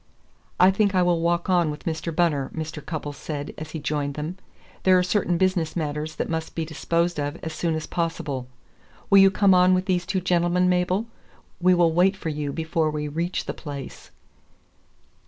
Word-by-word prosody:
"I 185 Hz, +1 st, +7 dB
think 200 Hz, 0 st, +1 dB
I 180 Hz, -, +4 dB
will 175 Hz, -1 st, +2 dB
walk 170 Hz, +1 st, 0 dB
on 175 Hz, -4 st, +3 dB
with 150 Hz, 0 st, -6 dB
Mr. 165 Hz, +1 st, -3 dB
Bunner," 155 Hz, -6 st, +1 dB
Mr. 155 Hz, -2 st, -5 dB
Cupples 145 Hz, -2 st, -5 dB
said 145 Hz, 0 st, -5 dB
as 155 Hz, 0 st, -7 dB
he 160 Hz, -, -5 dB
joined 145 Hz, -1 st, -2 dB
them. 155 Hz, +5 st, -5 dB, 0.4 s
"There 185 Hz, -1 st, +5 dB
are 180 Hz, -, +3 dB
certain 180 Hz, -1 st, +1 dB
business 185 Hz, -3 st, 0 dB
matters 155 Hz, -1 st, -3 dB
that -, -, -2 dB
must 160 Hz, -1 st, -4 dB
be 165 Hz, -, -2 dB
disposed 170 Hz, +1 st, -1 dB
of 145 Hz, +1 st, -2 dB
as 160 Hz, -, -4 dB
soon 165 Hz, 0 st, -1 dB
as 155 Hz, -1 st, -3 dB
possible. 150 Hz, -7 st, -3 dB, 0.6 s
Will 200 Hz, -, +8 dB
you 195 Hz, 0 st, +8 dB
come 195 Hz, 0 st, +4 dB
on 180 Hz, 0 st, +5 dB
with 185 Hz, 0 st, -1 dB
these 180 Hz, -2 st, 0 dB
two 190 Hz, +1 st, 0 dB
gentlemen, 180 Hz, 0 st, +2 dB
Mabel? 180 Hz, +3 st, +1 dB, 0.5 s
We 180 Hz, +1 st, +4 dB
will 170 Hz, -2 st, +3 dB
wait 185 Hz, +3 st, +3 dB
for 165 Hz, -, -4 dB
you 150 Hz, -2 st, -3 dB
before 160 Hz, 0 st, -1 dB
we 150 Hz, -1 st, -3 dB
reach 170 Hz, +5 st, -2 dB
the -, -, -3 dB
place." 140 Hz, -4 st, -8 dB
170 Hz, 190 wpm, -24 LUFS, 155-180 Hz, 0.6 s, Will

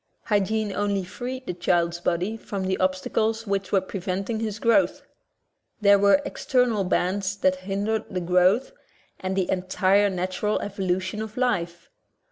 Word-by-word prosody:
'' -, -, -48 dB
Hygiene 205 Hz, +1 st, +1 dB
only 200 Hz, -1 st, 0 dB
freed 255 Hz, +7 st, -6 dB
the 180 Hz, -, -3 dB
child's 170 Hz, -1 st, +1 dB
body 180 Hz, +4 st, -1 dB
from 200 Hz, -3 st, -5 dB
the 190 Hz, 0 st, +1 dB
obstacles 215 Hz, +4 st, 0 dB
which 195 Hz, -2 st, -2 dB
were 195 Hz, -, +3 dB
preventing 195 Hz, +3 st, -3 dB
his 215 Hz, -2 st, -3 dB
growth. 235 Hz, +7 st, +2 dB, 0.8 s
There 200 Hz, -2 st, +5 dB
were 200 Hz, +9 st, +4 dB
external 245 Hz, -6 st, +1 dB
bands 190 Hz, +2 st, 0 dB
that 185 Hz, -2 st, +2 dB
hindered 210 Hz, +3 st, -1 dB
the 185 Hz, -, -2 dB
growth 180 Hz, -, +3 dB, 0.5 s
and 185 Hz, 0 st, -3 dB
the 190 Hz, -2 st, +1 dB
entire 190 Hz, +2 st, +2 dB
natural 185 Hz, +3 st, -1 dB
evolution 190 Hz, +1 st, -2 dB
of 220 Hz, +1 st, -7 dB
life. 175 Hz, -9 st, -1 dB
195 Hz, 145 wpm, -25 LUFS, 185-215 Hz, 0.8 s, There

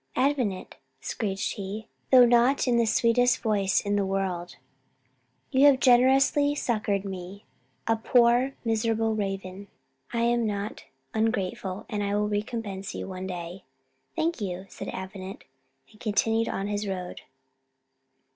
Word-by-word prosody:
"Avenant," 255 Hz, -9 st, 0 dB, 0.2 s
screeched 195 Hz, -, -3 dB
he, 205 Hz, +2 st, -6 dB, 0.2 s
though 255 Hz, -2 st, +8 dB
not 240 Hz, +3 st, +3 dB
in 240 Hz, -1 st, +3 dB
the 230 Hz, -1 st, +3 dB
sweetest 240 Hz, +2 st, +3 dB
voice 200 Hz, -4 st, +1 dB
in 205 Hz, 0 st, 0 dB
the 200 Hz, -, +2 dB
world; 190 Hz, -2 st, -2 dB, 1.0 s
"you 270 Hz, +2 st, +6 dB
have 270 Hz, -2 st, +5 dB
generously 270 Hz, +3 st, +4 dB
succoured 210 Hz, -7 st, -1 dB
me, 190 Hz, +1 st, -7 dB, 0.4 s
a 225 Hz, -, +2 dB
poor 240 Hz, +3 st, +3 dB
miserable 225 Hz, 0 st, +1 dB
raven. 195 Hz, -1 st, -4 dB, 0.4 s
I 235 Hz, -1 st, -1 dB
am 235 Hz, -1 st, +2 dB
not 205 Hz, 0 st, -4 dB, 0.3 s
ungrateful, 200 Hz, -3 st, -1 dB
and 210 Hz, -1 st, -3 dB
I 200 Hz, 0 st, -1 dB
will 210 Hz, 0 st, +1 dB
recompense 205 Hz, -2 st, -4 dB
you -, -, -5 dB
one 185 Hz, 0 st, -6 dB
day. 180 Hz, 0 st, -6 dB, 0.5 s
"Thank 330 Hz, -5 st, -1 dB
you," 190 Hz, -1 st, -4 dB
said -, -, -8 dB
Avenant, 190 Hz, 0 st, -7 dB, 0.5 s
and 215 Hz, -, -20 dB
continued 225 Hz, +1 st, +1 dB
his 205 Hz, +1 st, -2 dB
road. 180 Hz, -2 st, -5 dB
210 Hz, 130 wpm, -27 LUFS, 195-235 Hz, 1.0 s, though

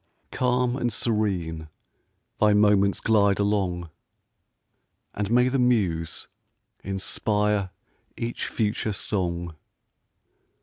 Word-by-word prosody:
Calm 125 Hz, 0 st, +1 dB
and 120 Hz, -3 st, -1 dB
serene 90 Hz, -9 st, -1 dB, 0.7 s
thy 105 Hz, 0 st, +4 dB
moments 105 Hz, -1 st, +3 dB
glide 100 Hz, -3 st, +3 dB
along, 95 Hz, -5 st, -1 dB, 1.2 s
And 105 Hz, -1 st, -3 dB
may 125 Hz, +2 st, +4 dB
the 130 Hz, +1 st, 0 dB
muse 95 Hz, -10 st, 0 dB, 0.6 s
inspire 100 Hz, +1 st, 0 dB, 0.5 s
each 120 Hz, +1 st, -3 dB
future 105 Hz, -1 st, -1 dB
song! 85 Hz, -4 st, -2 dB
105 Hz, 85 wpm, -25 LUFS, 95-110 Hz, 1.2 s, thy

